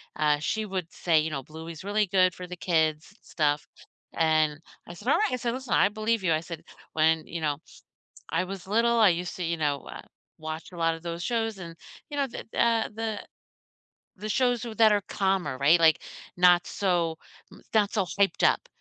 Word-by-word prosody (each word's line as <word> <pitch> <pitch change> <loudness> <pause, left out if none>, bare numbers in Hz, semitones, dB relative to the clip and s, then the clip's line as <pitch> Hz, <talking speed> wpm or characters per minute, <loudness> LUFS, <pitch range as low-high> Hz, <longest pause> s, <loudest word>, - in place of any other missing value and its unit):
uh, 150 -1 +2
she 215 +8 -1
would 185 -4 -4
say, 165 -3 +2
you 155 +1 -1
know, 135 -3 -4
"Bluey's 160 +3 -9
really 205 +1 +1
good 185 -1 +3
for 180 +1 -8
the 180 - -7
kids 160 0 0
stuff." 150 -2 -1 0.5
And, 155 -2 +2 0.3
I 175 - -8
said, 205 +7 -12
"Alright" 425 +9 +3
I - - +3
said, 235 -1 -2
"Listen, 260 0 -4
I - - +5
believe 215 0 -1
you," 175 - +2
I 155 - +2
said, 165 0 -8 0.3
"when," 160 0 +2
you 170 - -5
know, 150 -2 0 0.7
"I 165 +3 0
was 190 0 -7
little, 230 +3 +2
I 215 - +7
used 175 0 -1
to," 180 - -5
you 170 0 -1
know, 145 -3 0
uh, - - -9 0.4
"watch 155 +1 -6
a - - -10
lot 165 -1 +1
of 165 - -10
those 170 0 -5
shows 225 -1 -1
and" 170 -3 -8 0.4
you 290 - -5
know, 280 - +2
the 240 - -8
the, - - -1
uh 230 -1 +3
the 220 -1 -4 0.9
the 210 +3 -6
shows 245 0 +2
w 230 -2 -6
that 220 0 +6
are 205 -1 +3
calmer, 190 -8 0
right, 145 +6 +5
like, 160 -2 +5 0.4
not 175 0 +5
so 175 -4 0 0.3
n - - -15
not 210 -2 +3
so 200 -4 +1
hyped 200 -1 +2
up, - - 0
180 Hz, 205 wpm, -27 LUFS, 160-215 Hz, 0.9 s, I